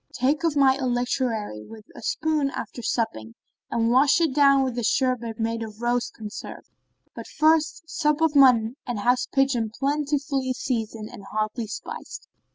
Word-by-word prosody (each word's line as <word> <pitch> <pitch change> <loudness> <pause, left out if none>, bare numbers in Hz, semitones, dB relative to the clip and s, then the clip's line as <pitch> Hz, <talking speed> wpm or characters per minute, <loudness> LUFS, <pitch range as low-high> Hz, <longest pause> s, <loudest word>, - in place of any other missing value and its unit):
Take 275 +5 +1
of 330 -3 +1
my 270 -1 +5
electuary 245 - -1
with 220 - -13
a - - -10
spoon 310 -3 0
after 250 - -6
supping, 115 - -2 0.3
and 230 0 +1
wash 275 +5 +5
it 325 -5 +1
down 275 -1 +5
with 255 -3 -2
a - - -3
sherbet 235 -1 0
made 230 0 -1
of 215 -1 -7
rose 240 0 0
conserve; 215 -1 -9 0.5
but - - -9
first 315 +1 +1
sup 300 -2 0
off 320 -2 +2
mutton 250 -4 +5
and 235 -4 -3
house 245 +3 +2
pigeon 270 -5 +1
plentifully 275 +1 -1
seasoned 225 -4 -4
and 195 - -11
hotly 215 +3 -3
spiced." 215 - -8
250 Hz, 160 wpm, -24 LUFS, 225-280 Hz, 0.5 s, my